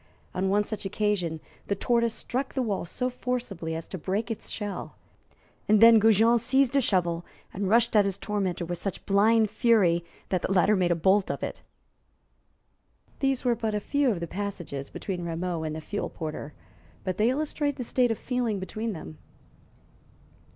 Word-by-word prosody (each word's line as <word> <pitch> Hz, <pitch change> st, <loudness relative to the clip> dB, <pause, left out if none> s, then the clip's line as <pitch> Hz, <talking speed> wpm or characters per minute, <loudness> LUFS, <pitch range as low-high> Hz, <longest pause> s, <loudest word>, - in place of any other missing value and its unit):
On 190 Hz, +1 st, 0 dB
one 205 Hz, +1 st, +3 dB
such 215 Hz, 0 st, -4 dB
occasion 195 Hz, -5 st, -1 dB, 0.3 s
the 200 Hz, -, 0 dB
tortoise 235 Hz, +2 st, +1 dB
struck 260 Hz, +2 st, -3 dB
the 260 Hz, -, +1 dB
wall 205 Hz, -6 st, -2 dB
so 250 Hz, +8 st, -2 dB
forcibly 240 Hz, -10 st, -3 dB
as 165 Hz, -, -5 dB
to 185 Hz, -, -5 dB
break 205 Hz, +8 st, -2 dB
its 225 Hz, -, -5 dB
shell, 205 Hz, -2 st, -5 dB, 0.7 s
and 215 Hz, 0 st, +5 dB
then 230 Hz, 0 st, +8 dB
Goujon 225 Hz, +2 st, +5 dB
seized 265 Hz, +2 st, +2 dB
a 275 Hz, -, +5 dB
shovel 175 Hz, -6 st, +1 dB, 0.3 s
and 195 Hz, 0 st, -2 dB
rushed 230 Hz, +1 st, +3 dB
at 205 Hz, -1 st, +6 dB
his 195 Hz, -1 st, -1 dB
tormentor 190 Hz, -5 st, -2 dB
with 175 Hz, 0 st, -4 dB
such 195 Hz, -, -4 dB
blind 215 Hz, +2 st, +4 dB
fury 190 Hz, -8 st, +3 dB, 0.3 s
that 185 Hz, -2 st, 0 dB
the -, -, -2 dB
latter 195 Hz, +2 st, +4 dB
made 180 Hz, -2 st, +2 dB
a 175 Hz, -, +3 dB
bolt 190 Hz, +4 st, +3 dB
of -, -, -3 dB
it. -, -, -5 dB, 1.6 s
These 270 Hz, -2 st, 0 dB
were 245 Hz, -, +4 dB
but 220 Hz, -2 st, -2 dB
a -, -, +1 dB
few 285 Hz, +5 st, +1 dB
of 190 Hz, -7 st, -1 dB
the -, -, -1 dB
passages 175 Hz, -8 st, -5 dB
between 180 Hz, -3 st, -5 dB
Rameau 170 Hz, 0 st, -3 dB
and 155 Hz, -1 st, -3 dB
the 160 Hz, -, -5 dB
fuel 205 Hz, +6 st, -4 dB
porter, 155 Hz, -2 st, -6 dB, 0.5 s
but 185 Hz, -1 st, -2 dB
they 220 Hz, +3 st, +3 dB
illustrate 290 Hz, +1 st, -1 dB
the 250 Hz, -, -4 dB
state 245 Hz, +1 st, +2 dB
of 225 Hz, -, -1 dB
feeling 245 Hz, -5 st, -1 dB
between 215 Hz, +4 st, -4 dB
them. 80 Hz, -, -9 dB
205 Hz, 180 wpm, -27 LUFS, 180-230 Hz, 1.6 s, then